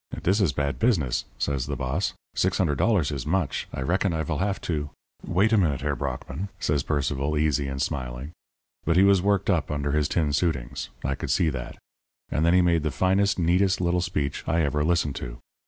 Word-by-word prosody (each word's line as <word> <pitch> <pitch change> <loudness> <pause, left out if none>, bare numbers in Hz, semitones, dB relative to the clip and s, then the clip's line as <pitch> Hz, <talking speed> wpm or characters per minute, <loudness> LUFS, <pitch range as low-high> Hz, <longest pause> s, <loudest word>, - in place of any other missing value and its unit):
"'Dis 100 +4 +2
is 90 -7 +3
bad 70 +1 -2
pizness,' 95 - +1
says 70 -2 -1
the 70 - -2
boss. 65 -1 -2 0.2
'Six 95 0 +1
hundred 75 -8 +1
dollars 95 -11 +2
is 70 -4 -3
much. 85 -3 0
I - - -5
reckon 90 +4 +1
I 80 -1 -1
vill 80 -1 -2
haf 100 0 0
to 75 -4 -2 0.2
' - - -67
"'Wait 100 +6 +2
a 110 - +5
minute, 75 -8 +1
Herr 75 -1 -1
Brockmann,' 70 +7 -4
says 75 -5 +1
Sir - - -13
Percival, 70 0 0
easy 75 -2 +1
and 70 0 -4
smiling. 65 0 -3 0.5
But 80 +2 +2
he 95 - +7
was 100 -2 +5
worked 100 -1 +2
up - - 0
under 75 -1 -1
his 75 0 +1
tin 80 -4 +1
suitings; 70 -6 -1 0.2
I 70 - +1
could - - -5
see 85 - +3
that. - - -6 0.5
And 75 - +1
then 85 +2 +4
he 90 - +5
made 85 -2 +3
the 75 - -1
finest, 95 +7 +2
neatest 90 +2 +2
little 90 0 +1
speech 75 -6 -2
I 80 +1 +2
ever 75 0 0
listened 80 -4 +1
to. - - -6
75 Hz, 215 wpm, -26 LUFS, 70-90 Hz, 0.5 s, he